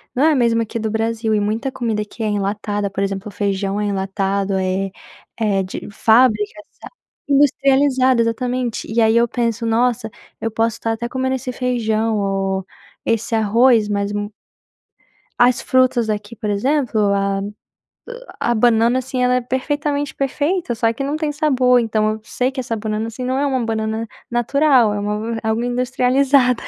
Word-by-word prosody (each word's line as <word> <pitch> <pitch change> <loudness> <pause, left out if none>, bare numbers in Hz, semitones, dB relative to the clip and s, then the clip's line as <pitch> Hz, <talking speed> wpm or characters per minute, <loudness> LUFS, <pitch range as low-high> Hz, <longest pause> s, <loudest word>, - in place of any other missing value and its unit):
não 260 - +2
é 320 - +5
a - - +2
mesma 230 -3 +2
que 225 - -5
do 220 -1 -2
Brasil 225 0 -1
e 210 - +2
muita 220 +6 -1
comida 225 -4 -2
aqui 215 +2 -8
é - - 0
enlatada, 205 0 -2
por 195 0 -2
exemplo, 195 +1 -3
o - - -11
feijão 200 0 -1
é - - -1
enlatado, 195 0 -1
é 190 +1 -1 0.5
é 205 -4 +1
de 185 - -7
fábricas 220 +5 +3 0.6
industrializada 275 -2 +3
exatamente. 245 +1 -2
E 230 +1 +2
aí 220 +1 +4
eu 235 0 +4
penso: 230 -1 -2
"Nossa, 230 0 +1 0.3
eu 225 - -2
posso 225 +1 0
estar 225 - -2
até 235 +1 -3
comendo 260 +1 -1
esse 255 0 -4
feijão 225 -3 0
ou 195 -1 -1 0.4
esse 230 0 -1
arroz, 225 +1 +3
mas 200 0 -1
mo" 205 0 -3 1.1
as 245 +1 +4
frutas 255 -3 +2
aqui, 210 +1 -4
por 215 -1 -4
exemplo, 250 +3 0
a 195 0 0 1.0
a 240 - +1
banana, 235 +2 +3
assim, 260 0 -3
ela 250 0 +3
é 250 - +1
perfeitamente 285 +3 -2
perfeita, 290 +2 -1
só 225 0 +1
que 275 - -4
não 285 +3 -2
tem 305 -2 -1
sabor. 260 -4 +3
Então 215 -2 +1
eu 215 0 -6
sei 250 +3 -1
que 270 - -6
essa 245 -2 -2
banana, 215 0 -3
assim, 230 +3 -7
não 260 +1 -1
é 285 - +1
uma 260 -4 0
banana 220 0 -2 0.2
natural, 240 -1 +3
é 205 - -2
uma 210 +3 -2
algo 220 +1 0
industrializada. 250 +1 +2
230 Hz, 170 wpm, -19 LUFS, 210-255 Hz, 1.1 s, é